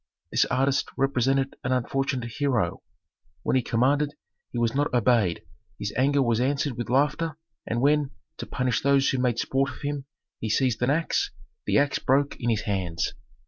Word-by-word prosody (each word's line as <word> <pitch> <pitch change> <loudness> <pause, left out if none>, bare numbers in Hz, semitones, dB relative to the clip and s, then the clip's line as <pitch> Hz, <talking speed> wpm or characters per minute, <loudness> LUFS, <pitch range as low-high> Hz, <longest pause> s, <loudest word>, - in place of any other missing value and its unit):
This - - +3
artist 135 +2 +1
represented 135 0 +1
an 125 - -1
unfortunate 130 0 0
hero: 120 -12 0 0.6
when - - +1
he 130 - +4
commanded 140 +6 +1 0.4
he - - -5
was 120 -1 +1
not 145 +1 +1
obeyed, 115 -7 +2 0.3
his 105 0 -4
anger 140 +3 +3
was 120 -1 +1
answered 140 0 0
with 120 -1 -4
laughter, 145 +4 +1 0.3
and 120 +1 -1
when, 145 0 +3 0.3
to - - -6
punish 125 -2 0
those 140 -1 +3
who 130 - 0
made 125 -2 +1
sport 135 +3 +1
of - - -10
him, 145 -1 -3 0.3
he 110 - -3
seized 120 0 +1
an 125 - +2
axe, 165 - +1 0.4
the - - +3
axe 140 0 +2
broke 140 +2 +2
in 120 - -1
his 110 -2 +1
hands. 95 -6 -2
130 Hz, 175 wpm, -26 LUFS, 120-140 Hz, 0.6 s, he